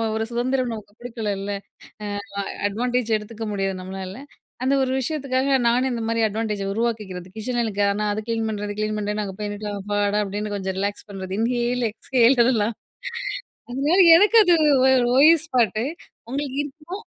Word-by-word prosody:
ஒரு 220 0 -1
சுதந்திரம் 250 +1 0
நமக்கு 205 -1 -9
குடுக்கலள்ல. 205 -4 -3 0.8
ஆமா 200 0 -4 0.3
அட்வான்டேஜ் 240 +1 0
எடுத்துக்க 220 +1 -7
முடியாது 195 -1 -1
நம்மளால. 190 +6 -7 0.4
அந்த 275 +1 +3
ஒரு 260 - 0
விஷயத்துக்காக 275 -1 0
நானும் 255 +2 +2
இந்த 230 -1 -3
மாரி 230 0 0
அட்வான்டேஜ் 210 -1 -2
உருவாக்கிக்கிறது. 210 -6 -3
கிச்சன்ல 235 -1 -1 0.2
ஆனா 210 +1 -2
அது 215 - -2
கிளீன் 225 -1 0
பண்றது 205 -1 -4
கிளீன் 215 0 -1
பண்றது, 210 0 -2
நான் 205 - -2
அங்க 190 -1 -7
போய் 205 -1 -2
நின்னுட்டு, 205 0 -5
அப்பாடா! 205 +1 0
அப்டின்னு 205 +1 -4
கொஞ்சம் 190 -1 -3
ரிலாக்ஸ் 200 +1 -3
பண்றது. 190 -1 -6
இன்ஹேல், 240 +1 0
எக்ஸ்ஹேல் 250 +1 +3
இதெல்லாம். 225 -3 +1 1.0
அதனால 290 +8 +1 0.2
எனக்கு 420 +5 +5
அது 350 -1 +5 0.6
ஓய்வு 315 +4 +8
ஸ்பாட்டு, 230 -5 +1 0.4
உங்களுக்கு 275 +1 -3
இருக்குமா? 310 +6 -8
225 Hz, 150 wpm, -23 LUFS, 205-255 Hz, 1.0 s, ஓய்வு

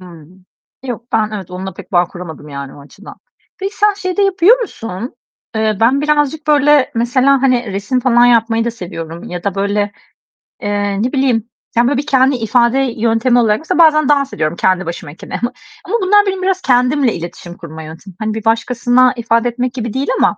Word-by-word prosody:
Hımm, 180 +1 -15 0.4
yok, 240 -1 -7
ben 215 -1 +1
evet 190 -3 -7
onunla 185 0 -6
pek - - -12
bağ 175 -1 +4
kuramadım 165 -5 -9
yani 140 -1 -7
o 145 - -13
açıdan. 145 +9 -14 0.4
Peki, 390 +2 -5
sen 415 0 +3
şey 370 -2 -4
de 410 - +2
yapıyor 395 +4 +4
musun? 225 - -6 0.4
Eee, 220 -1 0
ben 255 +5 +3
birazcık 300 0 0
böyle 295 -2 +4
mesela, 255 +3 +2
hani 250 -5 +1
resim 200 +6 -1
falan 240 -1 +4
yapmayı 230 -1 +3
da 235 - -1
seviyorum 170 -6 -8
ya 175 0 -7
da 200 -2 -1
böyle, 205 +1 -1 0.7
eee, 205 -1 -1
ne 250 - -1
bileyim, 245 -4 +1 0.3
yani 240 +1 +4
böyle 285 - +1
bir 285 - -2
kendi 265 -1 +3
ifade 235 +2 +2
yöntemi 235 -1 +1
olarak, 215 -2 +2
mesela 345 +3 -2
bazen 305 -3 +5
dans 280 -1 +2
ediyorum 155 +1 -1
kendi 185 0 +1
başımayken 165 -2 -8 0.6
ama 410 - -2
bunlar 410 +2 +4
benim 380 -1 -2
biraz 375 0 0
kendimle 250 -1 +2
iletişim 175 +1 -8
kurma 160 -1 -9
yöntemi. 165 +4 -11
Hani 215 0 -2
bir 220 -1 -6
başkasına 245 +2 +2
ifade 230 0 +1
etmek 250 +1 -3
gibi 235 -4 -4
değil 270 +2 -2
ama, - - +2
235 Hz, 185 wpm, -16 LUFS, 195-275 Hz, 0.7 s, bazen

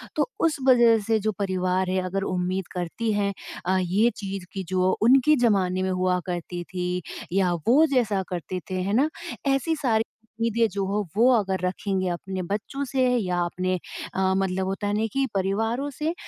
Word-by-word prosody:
तो - - +2
उस 325 -1 +2
वज़ह 240 -3 +6
से 220 -1 +3
जो 215 +1 0
परिवार 185 -1 0
है 185 0 +1
अगर 195 +1 -2
उम्मीद 185 0 -2
करती 180 +6 -2
हैं 200 -1 0 0.3
अ, 185 +1 +2
ये 200 +7 +3
चीज़ 195 -2 -5
कि 190 -1 -3
जो 185 0 +2
उनके 265 +6 +5
ज़माने 185 -3 +2
में 190 - 0
हुआ 185 0 +1
करती 175 0 -4
थी 180 0 -2 0.3
या 185 -2 +2
वो 290 +7 +6
जैसा 210 -6 +2
करते 180 +1 -4
थे। 185 - -3
है 200 +3 -1
ना? 280 +7 +3 0.4
ऐसी 275 +4 +1
सारी 225 -6 +1 0.4
उम्मीदें 230 0 +2
जो 195 0 -2
हो 205 +2 0
वो 240 +4 +5
अगर 195 -4 +1
रखेंगे 185 0 -1
अपने 185 +2 -4
बच्चों 215 +9 -3
से 260 0 +1
या 180 -5 -1
अपने 185 +1 -1 0.4
अ, 190 0 +1
मतलब 190 0 0
होता 195 +2 -2
है 205 - 0
नहीं 220 +2 +1
कि 270 0 +2
परिवारों 225 +8 0
से 315 +3 0
195 Hz, 185 wpm, -25 LUFS, 185-230 Hz, 0.4 s, वज़ह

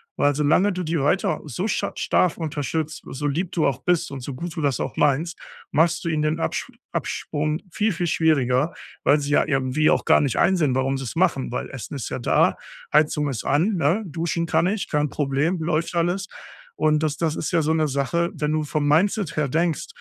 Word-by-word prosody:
weil 145 -1 +2
solange 150 +7 +3
du 180 0 -3
die 165 -1 -1
weiter 145 - +1
so 175 - -3
sch - - -1
stark 180 - +1
unterstützt, 155 -1 -3
so 145 +3 -5
lieb 170 +5 -1
du 165 - +1
auch 140 - -1
bist 180 -2 +1
und 140 - -5
so 140 - -6
gut 170 +3 -6
du 160 - -3
das 140 -3 0
auch - - -3
meinst, 150 +4 +1 0.3
machst 165 +4 +2
du 170 - -1
ihnen 155 -1 0
den 155 +2 0
Absch - - -2 0.2
Abprung 155 +2 -2
viel, 215 +3 +1
viel 175 +1 -2
schwieriger, 150 -3 +2 0.3
weil 150 - +4
sie 140 - -3
ja - - +4
irgendwie 135 +2 +1
auch - - +2
gar - - +5
nicht 140 -4 0
einsehen, 155 -9 +3
warum 135 +1 0
sie 135 - -5
es 120 - -6
machen, 140 -8 +1
weil - - -4
Essen 130 +2 -7
ist 135 - -4
ja - - -4
da, - - +2 0.4
Heizung 150 -1 +3
ist 125 - -4
an, 175 +9 +2
ne? 170 +7 +1
Duschen 170 0 -2
kann 160 +2 +2
ich, 205 +1 -1
kein 150 -1 +1
Problem, 145 +5 0
läuft 165 +1 -1
alles 175 +3 0 0.5
und 155 0 +2
das 150 -2 0
das 160 -2 0
ist - - -3
ja 170 - +3
so 155 - +1
'ne 155 -1 +2
Sache, 145 +5 0
wenn 150 0 -1
du 155 0 0
vom 150 0 -1
Mindset 180 +3 +2
her 150 -2 +1
denkst, 165 +3 0
155 Hz, 215 wpm, -23 LUFS, 145-170 Hz, 0.5 s, gar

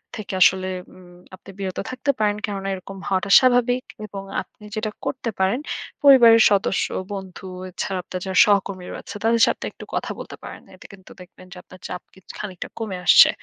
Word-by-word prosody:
থেকে 210 -2 -7
আসলে 185 0 +5 0.3
উম 185 -1 -16 0.3
আপনি 185 - -17
বিরত 190 -2 -4
থাকতে 265 +2 0
পারেন 210 -1 +2
কেননা 195 -2 -5
এরকম 195 +1 -8
হওয়াটা 190 +1 0
স্বাভাবিক। 250 -1 +2 0.2
এবং 195 -1 -7 0.2
আপনি - - -18
যেইটা 215 -1 -2
করতে 255 -4 -3
পারেন, 190 +6 +2 0.4
পরিবারের 240 -5 +8
সদস্য, 200 -1 +1 0.3
বন্ধু, 190 -1 -8 0.2
এছাড়া 190 +1 -4
আপনার 185 - -6
যারা 190 0 -2
সহকর্মীরা 195 -3 0
আছে - - -10
তাদের 230 +1 +3
সাথে - - -1
একটু - - -12
কথা - - -2
বলতে - - -9
পারেন। - - -9
এতে - - -17
কিন্তু 190 -1 -15
দেখবেন 180 0 -15
যে - - -12
আপনার 185 - -15
চাপ 180 - -6
কিছ 190 - -20
খানিকটা 190 -4 -6
কমে 210 -5 -4
আসছে। - - +8
195 Hz, 180 wpm, -22 LUFS, 190-225 Hz, 0.4 s, পরিবারের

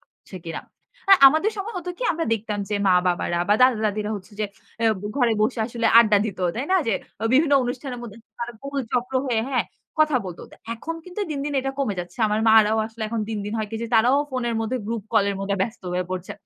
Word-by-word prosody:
করছে 190 - -15
কিনা। 165 -1 -5 0.5
আর 390 - +10
আমাদের 315 +10 +4
সময় 415 +3 -5
হতো 360 0 -5
কি - - -5
আমরা 330 0 -2
দেখতাম 210 -1 -4
যে, 210 - -1
মা-বাবারা 180 -2 +2
বা 205 - +5
দাদা-দাদিরা 215 -4 +2
হচ্ছে 195 +1 -12
যে - - +1 0.4
অ্যা 230 - +3 0.3
ঘরে 245 -4 +3
বসে 230 +3 0
আসলে 235 -1 -1
আড্ডা 215 -3 +6
দিত 205 -4 -5 0.2
তাই 245 - -2
না? - - +6
যে 225 - +2 0.3
অ - - 0
বিভিন্ন 290 +3 +4
অনুষ্ঠানের 250 +1 -4
মধ্যে 220 -3 -9 0.2
তারা 235 0 -4
গোল 280 0 -4
চক্র 250 +1 -1
হয়ে 235 -4 +1
হ্যাঁ, 255 - +1 0.3
কথা 310 -3 +4
বলত। 180 -3 -7
তা - - -14 0.2
এখন 320 +8 -5
কিন্তু 365 +3 -7
দিন, 295 - -2
দিন 295 - -3
এটা 270 +1 -3
কমে 265 -8 0
যাচ্ছে। 175 +7 -10
আমার 210 +1 0
মা'রাও 220 0 +5
আসলে 225 0 -9
এখন 230 0 -2
দিন, 220 -1 -3
দিন 210 - -5
হয় 215 -1 -2
কি 225 - -4
যে - - -2
তারাও 245 +5 +5
ফোনের 245 -3 -2
মধ্যে 225 +3 -1
গ্রুপ 225 -1 -3
কল 215 -3 +4
এর 200 - -3
মধ্যে 200 0 -1
ব্যস্ত 225 +2 -5
হয়ে 180 +1 -1
পড়ছে। 185 0 -4
230 Hz, 225 wpm, -23 LUFS, 210-260 Hz, 0.5 s, আর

